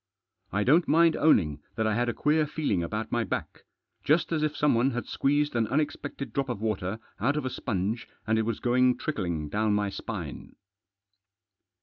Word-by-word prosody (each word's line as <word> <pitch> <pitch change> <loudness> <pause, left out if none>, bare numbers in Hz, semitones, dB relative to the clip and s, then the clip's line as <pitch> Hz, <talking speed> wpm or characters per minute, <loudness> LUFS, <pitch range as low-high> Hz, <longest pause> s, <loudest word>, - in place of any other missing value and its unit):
I 100 +1 +1
don't 160 +9 +4
mind 165 +1 +5
owning 80 - +3
that 110 - 0
I 110 - +2
had 120 +2 +1
a - - -1
queer 150 +1 +2
feeling 145 - -1
about 110 +6 -3
my 120 -1 +1
back. - - -5 0.4
Just 160 +4 +2
as 160 -2 +1
if 155 -1 -1
someone 135 -3 +3
had 120 -2 -3
squeezed 145 0 0
an 115 -2 +2
unexpected 145 +1 -2
drop 135 -1 -1
of 120 -5 -3
water 105 -2 -2 0.2
out 140 +8 +1
of 150 - -2
a 130 - -2
sponge, 110 +2 -2 0.2
and 110 0 +2
it - - +2
was 115 0 -2
going 125 0 +3
trickling 85 - -2
down 105 +5 +1
my 105 -1 0
spine. - - -6
120 Hz, 185 wpm, -28 LUFS, 105-145 Hz, 0.4 s, mind